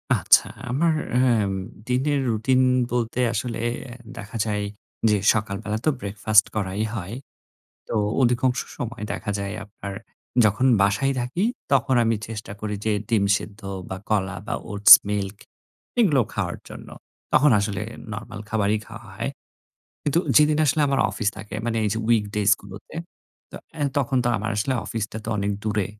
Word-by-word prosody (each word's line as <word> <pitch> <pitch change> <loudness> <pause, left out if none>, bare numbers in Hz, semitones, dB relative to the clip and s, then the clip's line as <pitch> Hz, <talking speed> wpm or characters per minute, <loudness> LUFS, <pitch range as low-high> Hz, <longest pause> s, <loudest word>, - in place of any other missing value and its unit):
আচ্ছা, - - +5 0.2
আমার 160 +5 +2 0.2
অ্যাম 115 -6 +3 0.4
দিনের 135 +3 +1
রুটিন 120 +4 +2 0.3
বলতে 120 0 -1
আসলে 115 -2 -3 0.6
দেখা 105 +3 -7
যায় 105 -1 -1 0.5
যে 105 - +3 0.2
সকাল 105 -3 -2
বেলা 105 +1 -2
তো - - +5
ব্রেকফাস্ট 105 +1 +3
করাই 100 +1 -1
হয়। 100 +3 -5 0.7
তো - - -3 0.3
অধিকাংশ 125 +1 +2 0.2
সময় 120 -2 -5
দেখা 105 - -3
যায় 100 +1 -4
আপনার 100 -1 -8 0.5
যখন 105 +6 +2 0.2
বাসায় 135 +8 +2
থাকি 125 +11 -2 0.3
তখন 135 -1 +3
আমি 115 0 +2
চেষ্টা 110 -2 -7
করি 105 -1 -3
যে 110 - +2 0.2
ডিম 110 -4 +3
সিদ্ধ 105 -1 -10 0.3
বা 95 - -4
কলা 100 -3 0
বা - - -1 0.2
ওটস 100 0 +9 0.2
মিল্ক 100 -1 -2 0.6
এগুলো 150 - +4
খাওয়ার - - -2
জন্য। - - -10 0.4
তখন 145 0 +6
আসলে 100 0 -2 0.3
নরমাল 105 -1 -7
খাবারই 105 -1 +1
খাওয়া - - -11
হয়। - - -2 0.7
কিন্তু 150 +3 +1 0.2
যেদিন 150 0 +5
আসলে 150 +2 +2
আমার 135 - +2
অফিস 110 - -1
থাকে 105 +1 -9
মানে 115 -1 -1
এই - - +2
যে 110 - -2
উইক 110 -3 +4
ডেইজ 105 -1 +2
গুলোতে, 100 +5 -12 0.6
তো - - -9 0.2
অ্যা 150 -2 -2
তখন 135 -1 0
তো - - +2
আমার 110 +2 -3
আসলে 130 +6 0
অফিসটা 110 -1 -4
তো - - -6
অনেক 100 0 0
দূরে। 105 -3 0
110 Hz, 155 wpm, -24 LUFS, 105-125 Hz, 0.7 s, ওটস